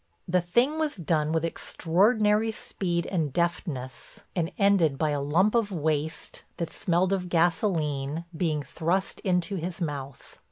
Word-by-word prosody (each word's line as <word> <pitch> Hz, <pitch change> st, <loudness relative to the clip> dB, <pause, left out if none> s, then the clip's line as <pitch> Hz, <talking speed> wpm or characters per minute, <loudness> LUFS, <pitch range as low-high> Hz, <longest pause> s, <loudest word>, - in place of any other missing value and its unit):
The 180 Hz, 0 st, +2 dB
thing 240 Hz, -, +1 dB
was 310 Hz, -2 st, 0 dB
done 155 Hz, -4 st, 0 dB
with 160 Hz, 0 st, +1 dB
extraordinary 210 Hz, +7 st, +2 dB
speed 175 Hz, -5 st, -2 dB
and 160 Hz, -7 st, -1 dB
deftness, 140 Hz, -6 st, -3 dB
and 170 Hz, -1 st, 0 dB
ended 190 Hz, -8 st, +3 dB
by 155 Hz, +1 st, +1 dB
a 145 Hz, -1 st, -1 dB
lump 170 Hz, +9 st, +2 dB
of 230 Hz, -4 st, +1 dB
waste, 155 Hz, -2 st, -2 dB
that 170 Hz, -, -3 dB
smelled 185 Hz, +1 st, +1 dB
of 180 Hz, -2 st, -2 dB
gasoline, 165 Hz, -4 st, +1 dB
being 155 Hz, -3 st, 0 dB
thrust 170 Hz, +7 st, -1 dB
into 185 Hz, +1 st, 0 dB
his 175 Hz, +1 st, -4 dB
mouth. 140 Hz, -5 st, -6 dB
170 Hz, 145 wpm, -27 LUFS, 155-195 Hz, -, ended